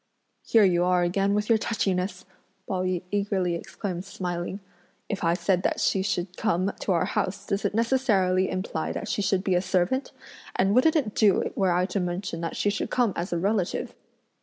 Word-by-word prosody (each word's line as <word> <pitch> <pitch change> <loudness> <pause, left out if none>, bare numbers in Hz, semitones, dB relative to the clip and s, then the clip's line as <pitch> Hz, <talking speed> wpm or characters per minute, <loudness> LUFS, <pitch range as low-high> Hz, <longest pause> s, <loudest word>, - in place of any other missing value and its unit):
"Here 225 -2 +4
you 175 -2 +3
are 180 0 +3
again 195 +3 +1
with 210 0 0
your 225 -2 +4
touchiness!" 185 -4 -1 0.4
Pao 185 -2 -1
yü 185 -1 -1
eagerly 200 -3 0
exclaimed 175 +1 -5
smiling, 180 -1 -4 0.5
"if 200 - -4
I 170 0 +3
said 180 0 +1
that - - 0
she 190 - +2
should 185 -2 -2
come 195 -3 0
to - - -1
our 170 - +2
house, 195 +2 -2
does 200 0 -2
it 200 - 0
necessarily 215 -7 +2
imply 185 -4 -3
that 210 - -5
she 210 - -1
should 195 -1 +1
be 190 - +1
a 180 - +3
servant? 185 +8 0 0.4
and 195 +1 +2
wouldn't 280 +8 +4
it 250 -10 +1
do 205 -4 +3
were 190 -2 +2
I 180 +1 +2
to 200 - -2
mention 180 -1 -3
that 165 - -3
she 205 - +1
should 205 - -3
come 240 -6 +1
as 175 +3 -3
a 175 - 0
relative!" 195 +1 -1
190 Hz, 195 wpm, -26 LUFS, 180-205 Hz, 0.5 s, Here